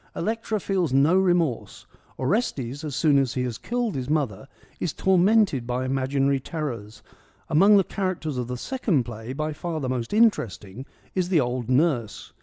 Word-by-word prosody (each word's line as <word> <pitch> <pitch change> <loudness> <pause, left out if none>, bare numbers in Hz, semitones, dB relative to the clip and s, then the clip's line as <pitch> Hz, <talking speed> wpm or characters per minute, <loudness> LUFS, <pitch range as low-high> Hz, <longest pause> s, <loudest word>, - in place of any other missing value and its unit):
Electra 220 +2 -2
feels 185 -6 -1
no 140 +6 +4
remorse; 175 -8 0 0.3
Orestes, 140 - -1
as 150 -4 -4
soon 145 -2 +4
as 135 -3 -1
he 125 - 0
has 120 -3 -4
killed 240 -3 -2
his 130 0 -4
mother, 140 -6 -1 0.3
is 170 - -2
tormented 190 - +3
by 125 +1 -1
imaginary 135 +1 +1
terrors. 120 -8 -6 0.5
Among 195 +6 +6
the 195 - +4
char 185 0 -2
acters 155 -4 -5
of 125 - -3
the 125 0 -4
second 195 - 0
play, 115 0 -7
by 155 +3 -3
far 160 +1 -4
the 135 - -3
most 125 -3 -3
interesting 130 - +1 0.3
is 180 -2 -1
the 175 -4 +3
old 125 -2 -2
Nurse. 130 -6 0
145 Hz, 170 wpm, -25 LUFS, 125-180 Hz, 0.5 s, Among